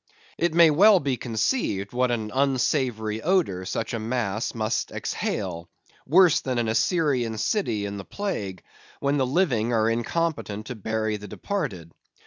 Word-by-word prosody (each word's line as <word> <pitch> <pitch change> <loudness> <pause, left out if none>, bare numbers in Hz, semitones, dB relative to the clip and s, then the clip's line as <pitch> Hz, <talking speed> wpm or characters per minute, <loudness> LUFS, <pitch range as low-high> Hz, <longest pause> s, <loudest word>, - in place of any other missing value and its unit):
It 170 -1 +1
may 170 -2 +7
well 195 +6 +6
be 140 -4 -1
conceived, 110 - -1
what 125 +1 +1
an 110 -3 -2
unsavory 125 -5 0
odor 155 - +1
such 110 - -3
a 115 - -2
mass 110 -2 -2
must 110 0 -1
exhale; 85 +1 -3 0.4
worse 175 +2 +5
than 130 -2 -2
an 120 -1 0
Assyrian 125 - +1
city 110 - 0
in 100 0 -5
the 100 - -6
plague, 100 - -4 0.4
when 140 +1 +1
the 130 -2 +1
living 125 - +1
are 110 -1 +2
incompetent 120 -3 -2
to 125 - -6
bury 110 0 -2
the 105 0 -10
departed. 105 - -4
120 Hz, 150 wpm, -25 LUFS, 110-150 Hz, 0.4 s, may